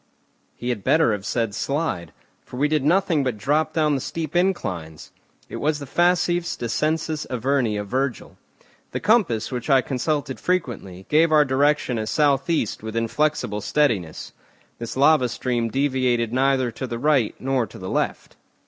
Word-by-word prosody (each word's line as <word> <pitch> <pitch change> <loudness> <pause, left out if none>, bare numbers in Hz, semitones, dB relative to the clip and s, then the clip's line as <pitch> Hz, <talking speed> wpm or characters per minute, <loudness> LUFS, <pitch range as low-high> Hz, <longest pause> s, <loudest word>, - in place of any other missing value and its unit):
He 120 - -5
had 115 -5 -2
better 155 +2 +3
have 105 -1 -3
said 115 -4 -1
slide, 140 - -2 0.3
for 125 - -10
we 145 +3 +2
did 150 -2 0
nothing 165 -1 +2
but 125 -5 -2
drop 150 +7 +1
down 155 -2 +1
the 135 - -1
steep 155 +2 -5
inclines. 90 - -2 0.4
It - - -7
was 150 +1 0
the 145 - -7
facifs 175 +3 +1
descensus 155 +6 -1
Averni 125 -3 0
of 105 - -4
Virgil. 130 +3 -2 0.6
The - - -1
compass, 165 - +2
which 125 +2 -4
I 135 -2 +5
consulted 135 +1 -2
frequently, 115 - -3
gave 160 +2 +3
our 150 -1 +5
direction 135 -2 +1
as 110 - -3
south 145 -1 +2
east 160 -10 0
with 110 0 -6
inflexible 115 -2 0
steadiness. 105 - -1 0.5
This 115 +1 -6
lava 140 -2 +4
stream 120 -1 -1
deviated 130 -3 0
neither 130 -1 +2
to 130 +3 -5
the 120 - -4
right 135 -4 +2
nor 130 -3 0
to - - -13
the 95 - -7
left. - - -2
135 Hz, 165 wpm, -23 LUFS, 115-155 Hz, 0.6 s, I